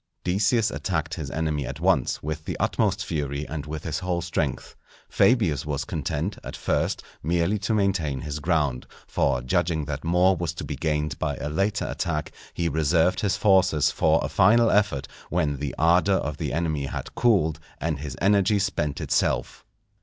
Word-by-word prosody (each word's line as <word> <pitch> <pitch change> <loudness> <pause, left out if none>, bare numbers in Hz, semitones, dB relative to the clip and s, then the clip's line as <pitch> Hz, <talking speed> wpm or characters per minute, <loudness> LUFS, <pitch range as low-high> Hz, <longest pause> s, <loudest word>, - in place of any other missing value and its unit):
Decius 105 +4 +2
attacked 85 -5 -2
his - - -4
enemy 75 -4 -2
at - - -6
once - - +1
with 75 +1 -4
the - - -4
utmost - - +1
fury 70 -1 -3
and 75 -1 -5
with 75 0 -5
his 80 - -2
whole 90 -2 -1
strength. 85 -6 -2 0.3
Fabius 105 - +3
was 70 -2 -3
content, 85 +2 -3
at - - -7
first, - - -1 0.2
merely 85 +6 +1
to 110 +2 0
maintain 90 -10 0
his 75 0 -4
ground; 75 -5 0 0.2
for 65 - 0
judging 80 +4 0
that 75 -1 -5
more 90 +3 +3
was 85 -3 -3
to - - -5
be - - -4
gained 75 -1 -1
by 70 - -1
a 75 - -4
later 100 +7 0
attack, 75 -5 -2 0.2
he 85 - 0
reserved 80 +3 +2
his 100 -2 0
forces 95 -7 +3
for - - +3
a - - -1
final 115 +5 +4
effort, 85 -10 +1 0.2
when 80 -5 0
the 70 -1 -4
ardour 90 +5 +4
of 75 -5 -2
the - - -3
enemy 80 -3 -1
had - - -6
cooled 85 -10 +2 0.2
and 80 -3 -2
his 70 -3 -6
energy 100 +1 +3
spent 95 -8 -1
itself. - - 0
80 Hz, 175 wpm, -25 LUFS, 75-95 Hz, 0.3 s, final